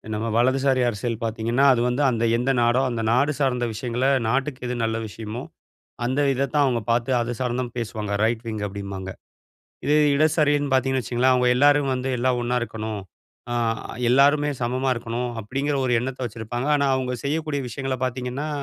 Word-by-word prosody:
நம்ம 110 Hz, +2 st, -2 dB
வலதுசாரி 130 Hz, +2 st, +2 dB
அரசியல் 115 Hz, +1 st, -3 dB
பார்த்தீங்கன்னா 115 Hz, +4 st, +1 dB
அது 120 Hz, -, 0 dB
வந்து 125 Hz, +3 st, 0 dB
அந்த 115 Hz, -2 st, -1 dB
எந்த 125 Hz, +3 st, +1 dB
நாடோ 120 Hz, +2 st, +3 dB
அந்த 120 Hz, -2 st, -2 dB
நாடு 140 Hz, +5 st, +3 dB
சார்ந்த 125 Hz, -3 st, +1 dB
விஷயங்கள 120 Hz, +3 st, -1 dB, 0.2 s
நாட்டுக்கு 135 Hz, +3 st, -1 dB
எது 125 Hz, -, -2 dB
நல்ல 115 Hz, 0 st, 0 dB
விஷயமோ 110 Hz, +2 st, -7 dB, 0.6 s
அந்த 130 Hz, +4 st, 0 dB
இதத்தான் 140 Hz, +2 st, +1 dB
அவங்க 120 Hz, -3 st, 0 dB
பார்த்து 120 Hz, +2 st, +1 dB
அது 120 Hz, 0 st, -2 dB
சார்ந்துதான் 125 Hz, -1 st, -2 dB
பேசுவாங்க. 110 Hz, -3 st, -4 dB
ரைட் 115 Hz, 0 st, 0 dB
விங் 110 Hz, -2 st, -4 dB
அப்டிம்பாங்க. 100 Hz, -1 st, -6 dB, 0.7 s
இதே 150 Hz, -, +3 dB, 0.2 s
இடதுசாரின்னு 145 Hz, -1 st, +2 dB
பார்த்தீங்கன்னு 130 Hz, 0 st, +2 dB
வச்சுக்கங்களேன் 125 Hz, +3 st, +2 dB
அவங்க 125 Hz, -1 st, +3 dB
எல்லாரும் 145 Hz, 0 st, +4 dB
வந்து 130 Hz, +1 st, -3 dB
"எல்லாம் 125 Hz, 0 st, +1 dB
ஒண்ணா 125 Hz, +1 st, 0 dB
இருக்கணும். 110 Hz, -2 st, -4 dB, 0.5 s
அ -, -, -1 dB, 0.6 s
எல்லாருமே 145 Hz, +3 st, +4 dB
சமமா 130 Hz, +3 st, -1 dB
இருக்கணும்" 120 Hz, +1 st, -3 dB
அப்படிங்கிற 135 Hz, +7 st, -2 dB
ஒரு 125 Hz, -, +1 dB
எண்ணத்தை 130 Hz, +2 st, -5 dB
வச்சிருப்பாங்க. 115 Hz, +3 st, -5 dB
ஆனா 140 Hz, -1 st, +1 dB
அவங்க 130 Hz, -1 st, -2 dB
செய்யக்கூடிய 150 Hz, 0 st, -1 dB
விஷயங்கள 135 Hz, +2 st, -3 dB
பார்த்தீங்கன்னா 130 Hz, +3 st, -3 dB
125 Hz, 160 wpm, -23 LUFS, 115-135 Hz, 0.7 s, எல்லாரும்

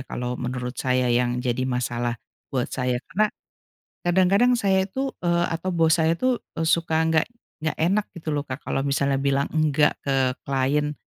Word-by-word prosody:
kalau 125 Hz, -1 st, -4 dB
menurut 125 Hz, 0 st, -4 dB
saya 125 Hz, -1 st, +1 dB
yang 125 Hz, 0 st, +1 dB
jadi 125 Hz, 0 st, -1 dB
masalah 120 Hz, -1 st, -1 dB, 0.4 s
buat 130 Hz, -2 st, 0 dB
saya, 125 Hz, -1 st, -1 dB
karena 215 Hz, +2 st, +1 dB, 0.8 s
kadang-kadang 190 Hz, +7 st, +4 dB
saya 190 Hz, -2 st, +2 dB
itu, 265 Hz, +7 st, -3 dB
eee, 170 Hz, 0 st, +2 dB
atau 170 Hz, +3 st, -2 dB
bos 165 Hz, 0 st, +4 dB
saya 160 Hz, 0 st, +3 dB
itu 255 Hz, +7 st, +1 dB, 0.2 s
e 165 Hz, -, -2 dB
suka 165 Hz, -1 st, +2 dB
nggak 160 Hz, -1 st, +2 dB, 0.4 s
nggak 155 Hz, -, -1 dB
enak 195 Hz, +5 st, +2 dB
gitu 165 Hz, -2 st, -9 dB
loh 145 Hz, 0 st, -1 dB
Kak, 130 Hz, +1 st, -6 dB
kalau 135 Hz, -, -2 dB
misalnya 140 Hz, 0 st, +1 dB
bilang 140 Hz, 0 st, +1 dB
enggak 155 Hz, -1 st, +3 dB
ke 135 Hz, -2 st, +1 dB
klien, 140 Hz, +2 st, 0 dB
145 Hz, 170 wpm, -24 LUFS, 130-170 Hz, 0.8 s, kadang-kadang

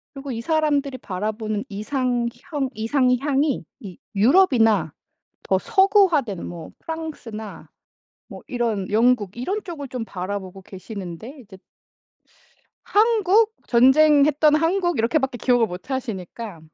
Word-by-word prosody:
그리고 275 Hz, 0 st, -6 dB
이 230 Hz, -1 st, -4 dB
사람들이 290 Hz, -3 st, 0 dB
바라보는 215 Hz, +1 st, -4 dB
이상형 245 Hz, +5 st, -2 dB
이상향이 265 Hz, +4 st, +1 dB, 0.2 s
이 190 Hz, -5 st, -9 dB, 0.2 s
유럽이나 225 Hz, -, +4 dB, 0.5 s
더 190 Hz, -, +1 dB
서구화된 360 Hz, -, +2 dB
뭐 170 Hz, -2 st, -8 dB
프랑스나 290 Hz, -10 st, -7 dB, 0.6 s
뭐 -, -, -11 dB
이런 230 Hz, -6 st, -2 dB
영국 220 Hz, -3 st, +2 dB
이런 385 Hz, -, -3 dB
쪽을 315 Hz, -7 st, -7 dB
좀 250 Hz, -3 st, -5 dB
바라보고 190 Hz, -1 st, -6 dB
계시는데 195 Hz, -, -9 dB
이제 205 Hz, -5 st, -14 dB, 1.3 s
한국? 435 Hz, 0 st, +3 dB
전쟁했던 295 Hz, +4 st, +5 dB
한국 345 Hz, +1 st, +1 dB
이렇게밖에 265 Hz, +2 st, 0 dB
기억을 245 Hz, -1 st, +2 dB
못 180 Hz, +8 st, -9 dB
하시니까. 220 Hz, -5 st, -5 dB
250 Hz, 270 characters per minute, -22 LUFS, 210-300 Hz, 1.3 s, 전쟁했던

